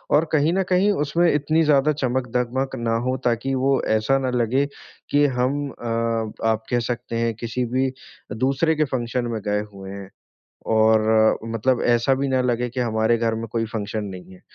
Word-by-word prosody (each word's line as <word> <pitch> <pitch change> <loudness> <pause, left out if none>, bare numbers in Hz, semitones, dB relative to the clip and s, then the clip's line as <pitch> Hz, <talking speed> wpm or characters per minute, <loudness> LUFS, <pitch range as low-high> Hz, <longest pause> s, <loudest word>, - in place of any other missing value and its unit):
और 155 +3 +4
कहीं 155 +1 +3
न 190 +1 +1
कहीं 185 +3 +3
उसमें 170 +4 +2
इतनी 150 +2 +1
ज़्यादा 150 -1 +3
चमक-धमक 130 0 -1
ना 115 -2 -1
हो 130 - 0
ताकि 120 +3 0
वो 135 +1 +2
ऐसा 110 +5 +2
ना 130 -1 -1
लगे 125 +3 +1 0.5
कि 145 0 +4
हम 135 +2 0
अ, 115 -2 -2 0.2
आप 110 0 +1
कह 120 - +2
सकते 120 0 -4
हैं 115 0 0
किसी 115 +3 -3
भी 130 +1 +2 0.4
दूसरे 135 +8 +1
के 155 - +2
फंक्शन 120 0 -1
में 110 - -3
गए 105 0 0
हुए 95 -1 -9
हैं, 100 -1 -8 0.6
और 110 0 +4 0.2
मतलब 125 +3 +1
ऐसा 120 +2 +3
भी 140 +1 -1
ना 130 -1 +1
लगे 125 -1 0
कि 125 +2 -5
हमारे 115 -1 +1
घर 115 -1 0
में 115 +1 -5
कोई 115 -1 -1
फंक्शन 110 -1 -4
नहीं 95 -1 -9
है। 90 - -16
120 Hz, 185 wpm, -22 LUFS, 115-135 Hz, 0.6 s, और